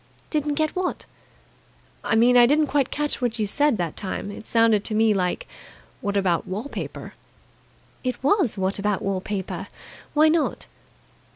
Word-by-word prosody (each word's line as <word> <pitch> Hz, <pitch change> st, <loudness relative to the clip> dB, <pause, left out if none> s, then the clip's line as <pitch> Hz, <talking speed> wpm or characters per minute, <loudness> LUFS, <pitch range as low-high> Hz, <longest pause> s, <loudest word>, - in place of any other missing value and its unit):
"Didn't 295 Hz, -1 st, 0 dB
get 310 Hz, 0 st, +1 dB
what?" 370 Hz, 0 st, -2 dB, 1.0 s
"I -, -, +1 dB
mean, 240 Hz, +2 st, +5 dB
I 240 Hz, -1 st, +7 dB
didn't 300 Hz, +3 st, +3 dB
quite 280 Hz, -2 st, 0 dB
catch 295 Hz, -1 st, -2 dB
what 240 Hz, -1 st, -1 dB
you 215 Hz, -, 0 dB
said 285 Hz, +4 st, +2 dB
that 170 Hz, -4 st, -3 dB
time. 200 Hz, +1 st, -5 dB
It 210 Hz, -, -10 dB
sounded 225 Hz, -3 st, +3 dB
to 215 Hz, -, -1 dB
me 220 Hz, 0 st, +4 dB
like 180 Hz, -2 st, -1 dB, 0.5 s
'What 200 Hz, 0 st, -1 dB
about 180 Hz, -4 st, +1 dB
wall 195 Hz, +4 st, -3 dB
paper?'" -, -, -6 dB, 0.9 s
"It 255 Hz, 0 st, -3 dB
was 290 Hz, -, +2 dB
'What 190 Hz, +1 st, 0 dB
about 205 Hz, +1 st, -1 dB
wall 195 Hz, -2 st, -1 dB
paper?' 195 Hz, -2 st, -4 dB, 0.5 s
Why 305 Hz, +1 st, +6 dB
not?" 315 Hz, 0 st, 0 dB
225 Hz, 165 wpm, -24 LUFS, 200-290 Hz, 1.0 s, I